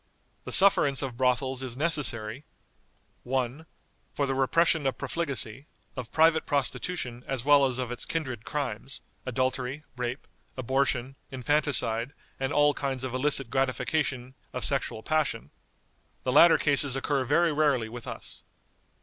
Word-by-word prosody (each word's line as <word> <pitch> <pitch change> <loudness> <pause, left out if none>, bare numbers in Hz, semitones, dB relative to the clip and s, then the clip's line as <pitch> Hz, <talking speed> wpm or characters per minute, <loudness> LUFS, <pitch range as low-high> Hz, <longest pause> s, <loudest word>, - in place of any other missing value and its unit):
"The - - -6
sufferance 145 -8 +5
of 130 -3 -4
brothels 130 +1 0
is 130 -2 -4
necessary, 135 -6 0 0.8
"1. 130 +4 -3 0.5
For 140 - +1
the 135 - -1
repression 150 +3 +2
of 135 - -2
profligacy, 140 -3 -4 0.3
of 125 -3 -7
private 160 0 +3
prostitution 135 -2 -2
as 135 -2 -3
well 145 -1 +6
as 125 -2 -4
of 125 -2 -3
its 125 - -5
kindred 130 -9 -3
crimes, 135 -2 -4 0.3
adultery, 130 +3 -2
rape, 125 +2 -4 0.3
abortion, 130 0 -1
infanticide, 130 -2 0 0.3
and 135 +1 -2
all 145 0 +4
kinds 135 -3 -3
of 130 -2 -4
illicit 135 +1 +2
gratification 130 0 -1 0.2
of - - -2
sexual 110 - -1
passion. 150 - -1 0.7
The 130 - 0
latter 165 +5 +7
cases 140 -2 +4
occur 135 0 0
very 160 +5 +2
rarely 145 -6 +2
with 120 +1 -9
us. - - -7
135 Hz, 135 wpm, -27 LUFS, 125-145 Hz, 0.8 s, latter